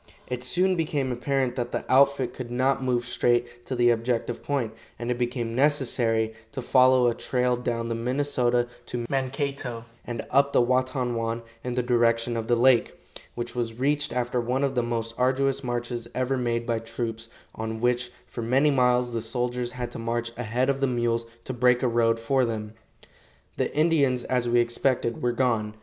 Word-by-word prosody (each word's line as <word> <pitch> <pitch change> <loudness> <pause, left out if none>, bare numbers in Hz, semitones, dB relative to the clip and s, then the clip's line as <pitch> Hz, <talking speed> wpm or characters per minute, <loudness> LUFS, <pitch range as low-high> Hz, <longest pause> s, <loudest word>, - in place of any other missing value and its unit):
It 125 -1 -4
soon 185 +8 +2
became 150 -5 -1
apparent 130 0 -1
that 120 -1 -2
the - - -3
outfit 135 -1 +3
could 125 -2 -7
not 130 +2 +1
move 125 -2 0
straight 120 0 0
to 130 - -2
the 120 0 +4
objective 115 0 -1
point, 130 -6 -2 0.2
and 120 +1 -3
it 120 - -1
became 120 -1 -2
necessary 120 -5 +1 0.2
to 130 - -4
follow 130 0 +5
a 120 - +2
trail 125 +1 0
down 120 -1 -2
the 115 - -1
Minnesota 125 0 0 0.2
to 120 -1 -3
Mankato 135 -3 -2 0.2
and 120 -2 -5
up 140 +1 +3
the - - +5
Watonwan 120 -2 0 0.2
in 125 -1 -3
the 125 - +1
direction 120 -1 +2
of 115 -1 -3
the 120 - +3
lake, 120 0 +3 0.4
which 120 0 -4
was 115 -2 -2
reached 145 +3 +1
after 120 0 -1
one 125 +3 -1
of 135 -1 +1
the 125 - +1
most 115 -1 -2
arduous 135 +2 +1
marches 120 -1 -3
ever 130 +1 0
made 120 -2 -1
by 115 -1 0
troops, 115 0 -5 0.2
on 110 0 -4
which 120 +1 0
for 120 - -7
many 135 +6 +3
miles 125 -2 +2
the 115 - -1
soldiers 120 +1 -2
had 125 -1 -5
to - - -7
march 115 0 -2
ahead 120 +2 -1
of 140 0 0
the 135 - +3
mules 120 -2 0 0.2
to 130 - -5
break 125 0 +3
a - - +3
road 115 -1 +2
for 130 +3 +1
them. 110 -2 -3 0.8
The - - 0
Indians, 145 -6 +3
as 125 -2 0
we 120 0 +4
expected, 120 0 0
were 120 - +1
gone. 115 -4 0
120 Hz, 185 wpm, -26 LUFS, 115-130 Hz, 0.8 s, follow